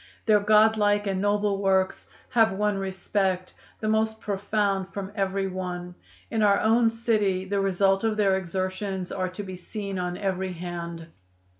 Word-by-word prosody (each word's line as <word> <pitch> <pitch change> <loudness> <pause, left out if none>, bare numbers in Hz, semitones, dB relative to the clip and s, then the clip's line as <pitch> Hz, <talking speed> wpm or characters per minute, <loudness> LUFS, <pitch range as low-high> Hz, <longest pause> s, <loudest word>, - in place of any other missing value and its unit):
"Their 215 -2 +5
God 215 +1 +5
like 205 0 +2
and 190 -1 -1
noble 205 -1 +1
works 190 -1 +1 0.2
have 225 -4 +4
won 205 0 0
respect, 190 -1 -1 0.3
the 215 - -1
most 220 0 +1
profound 200 -1 -1
from 195 0 -5
every 195 -1 -1
one. 180 -1 -5 0.4
In 225 - 0
our 200 -1 +4
own 225 +1 +4
city 215 -5 0
the 200 +1 -1
result 195 +1 +2
of 220 -1 0
their 195 -2 +3
exertions 185 +1 -3
are 185 -1 -2
to 185 +3 -7
be 185 -1 -7
seen 195 +1 -5
on 180 0 -3
every 190 -2 -2
hand. 170 -1 -6
195 Hz, 160 wpm, -26 LUFS, 185-210 Hz, 0.4 s, Their